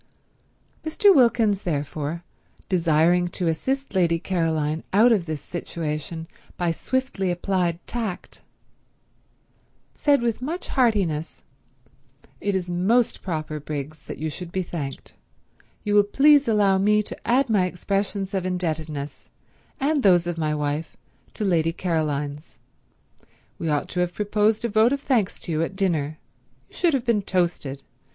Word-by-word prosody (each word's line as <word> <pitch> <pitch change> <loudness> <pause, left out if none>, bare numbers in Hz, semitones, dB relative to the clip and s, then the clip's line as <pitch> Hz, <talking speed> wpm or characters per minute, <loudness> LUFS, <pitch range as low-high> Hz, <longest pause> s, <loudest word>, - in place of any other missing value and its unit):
Mr. 390 +6 +4
Wilkins 230 -6 +4
therefore, 155 +1 -3 0.4
desiring 175 0 +3
to 175 0 -3
assist 265 +12 -1
Lady 170 -3 +3
Caroline 160 -3 -1
out 220 +5 +5
of 195 -7 +2
this 155 -2 -3
situation 160 -1 -5 0.3
by 175 -2 +1
swiftly 260 0 -2
applied 175 -1 0
tact, 225 -6 -5 1.5
said 285 -4 +2
with 235 0 -1
much 325 +8 -4
heartiness: 200 - 0 1.0
"It 200 -1 -1
is 185 -1 -1
most 195 +8 +1
proper, 155 -4 -3
Briggs, 150 +1 -6
that - - -7
you 160 - -3
should 175 +2 -7
be 190 0 -1
thanked. 150 -6 -6 0.7
You 205 - -1
will 205 0 +6
please 285 +7 +5
allow 205 -3 +3
me 210 +2 +3
to - - -9
add 260 +4 +3
my 200 -5 +2
expressions 195 +2 -2
of 190 -2 0
indebtedness, 160 -5 -4 0.5
and 290 +1 +1
those 180 -5 +5
of 175 -1 -2
my 155 -2 -1
wife, 150 +2 -3 0.4
to 210 - -2
Lady 165 -4 +2
Caroline's. 150 -4 -2 1.0
We 165 - -2
ought 150 -1 0
to 180 - -3
have 175 0 0
proposed 210 +2 +1
a - - 0
vote 220 +4 +4
of 280 - -1
thanks 240 -10 0
to 175 - -5
you 155 0 0
at 165 +3 -2
dinner. 160 -6 0 0.5
You - - -19
should 335 -5 +2
have 255 -2 -2
been 230 -3 +2
toasted. 170 -8 -1
180 Hz, 145 wpm, -24 LUFS, 160-215 Hz, 1.5 s, will